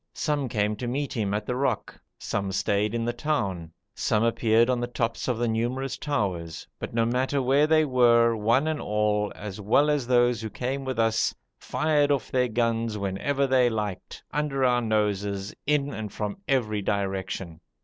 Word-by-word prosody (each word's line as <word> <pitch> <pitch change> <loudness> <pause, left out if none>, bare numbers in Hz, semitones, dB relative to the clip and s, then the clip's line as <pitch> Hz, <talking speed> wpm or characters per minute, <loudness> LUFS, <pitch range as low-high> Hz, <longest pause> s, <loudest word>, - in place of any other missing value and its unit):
Some 145 -4 -1
came 105 -1 0
to 125 - -4
meet 140 +4 -2
him 105 -5 -1
at 105 - -3
the 125 - -2
rock, 130 -4 -2 0.2
some 100 -1 -3
stayed 100 +3 0
in 115 0 -1
the 120 - -1
town, 100 - -2 0.2
some 105 +1 +1
appeared 115 0 +3
on 125 -1 +1
the 120 - -2
tops 115 -1 -2
of 125 -3 0
the 120 +1 0
numerous 120 +4 -1
towers, 95 - -3
but - - -5
no 115 0 +1
matter 130 +4 0
where 135 +3 +3
they 155 0 +4
were, 120 -3 +4
one 115 +6 +2
and 155 -2 -1
all, 105 0 0
as 105 -1 -7
well 140 +9 +3
as 145 -5 0
those 120 -2 +3
who 110 - -4
came 135 +4 -3
with 130 -2 -3
us, 115 -1 +1 0.2
fired 150 -2 +1
off 140 -3 -1
their 125 -1 +2
guns 115 -1 0
whenever 105 +9 -1
they 130 -2 +3
liked, 105 -4 -5
under 140 -2 0
our 125 -1 +3
noses, 105 -2 -1
in 145 -1 +1
and 110 -2 -5
from 105 -1 -4
every 110 -6 +1
direction. 95 -4 -3
115 Hz, 180 wpm, -26 LUFS, 105-130 Hz, 0.2 s, they